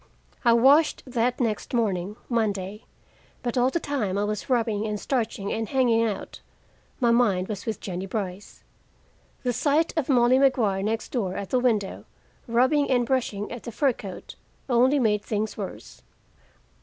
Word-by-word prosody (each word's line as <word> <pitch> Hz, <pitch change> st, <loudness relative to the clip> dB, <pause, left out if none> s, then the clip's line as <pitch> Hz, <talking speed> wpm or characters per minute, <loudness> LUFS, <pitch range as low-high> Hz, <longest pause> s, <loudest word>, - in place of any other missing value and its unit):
I 235 Hz, -2 st, +5 dB
washed 275 Hz, +7 st, +4 dB
that 245 Hz, -1 st, 0 dB
next 230 Hz, 0 st, -1 dB
morning, 200 Hz, -4 st, 0 dB
Monday, 210 Hz, -3 st, -2 dB, 0.6 s
but 240 Hz, -2 st, -2 dB
all 250 Hz, 0 st, +3 dB
the 340 Hz, -, -1 dB
time 230 Hz, -, -2 dB
I 205 Hz, -, +1 dB
was 210 Hz, +3 st, -3 dB
rubbing 225 Hz, -4 st, +1 dB
and 210 Hz, -1 st, -3 dB
starching 220 Hz, -6 st, -2 dB
and 225 Hz, -1 st, -3 dB
hanging 240 Hz, -4 st, +3 dB
out, 215 Hz, -3 st, -4 dB, 0.6 s
my 240 Hz, -3 st, +3 dB
mind 205 Hz, -6 st, +2 dB
was 210 Hz, -1 st, -6 dB
with 220 Hz, -, -2 dB
Jennie 185 Hz, 0 st, -5 dB
Brice. 195 Hz, -1 st, -5 dB, 0.8 s
The 250 Hz, -1 st, 0 dB
sight 300 Hz, +6 st, +1 dB
of 310 Hz, -4 st, -1 dB
Molly 250 Hz, 0 st, +4 dB
Maguire, 235 Hz, -8 st, +2 dB
next 220 Hz, +3 st, -2 dB
door, 195 Hz, -7 st, -2 dB
at 200 Hz, -2 st, -5 dB
the 255 Hz, -, +3 dB
window, 220 Hz, -6 st, 0 dB, 0.4 s
rubbing 260 Hz, +5 st, +2 dB
and 245 Hz, -2 st, +2 dB
brushing 230 Hz, -5 st, -1 dB
at 240 Hz, -1 st, -6 dB
the 235 Hz, -, -7 dB
fur 265 Hz, +3 st, +2 dB
coat, 195 Hz, -4 st, -9 dB, 0.3 s
only 255 Hz, +3 st, +4 dB
made 215 Hz, -5 st, +2 dB
things 215 Hz, 0 st, -2 dB
worse. -, -, -8 dB
230 Hz, 160 wpm, -25 LUFS, 205-255 Hz, 0.8 s, I